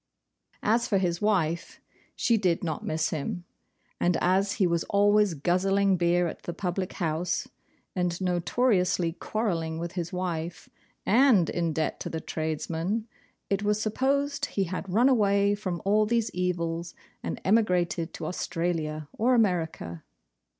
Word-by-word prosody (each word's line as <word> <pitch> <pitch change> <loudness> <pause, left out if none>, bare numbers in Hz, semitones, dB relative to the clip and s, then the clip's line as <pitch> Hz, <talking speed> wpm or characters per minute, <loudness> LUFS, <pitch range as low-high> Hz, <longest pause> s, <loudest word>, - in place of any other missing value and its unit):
As 235 +3 +2
for 205 - +2
his 175 -2 0
wife, 170 -6 0 0.4
she 235 - +2
did 185 -6 +1
not 160 -3 -3
miss 160 0 -1
him; 175 +4 -3 0.5
and 175 0 +2
as 190 +2 +2
he 195 - +2
was 170 -2 +1
always 205 -2 +3
guzzling 195 +5 +2
beer 175 0 +2
at - - -7
the 175 - -6
public 180 0 -2
house, 165 0 -1 0.5
and 180 -2 -1
notoriously 180 -1 +1
quarrelling 170 -6 -2
with 170 +1 -4
his 175 -2 -4
wife, 175 -2 -4 0.4
and 230 - +5
in 170 -1 0
debt 155 0 -1
to - - -4
the 160 - -3
tradesmen, 165 +7 -2 0.4
it 195 0 0
was 210 0 +1
supposed 275 +6 0
he 195 - -1
had 185 +1 -4
run 235 +7 +4
away 200 -5 +3
from 185 -5 -4
all 210 +2 +3
these 230 0 +1
evils, 170 -2 -2 0.3
and 240 - -4
emigrated 180 -5 +2
to - - -5
Australia 165 -4 -2
or 250 +3 +4
America. 165 - 0
180 Hz, 145 wpm, -27 LUFS, 170-205 Hz, 0.5 s, and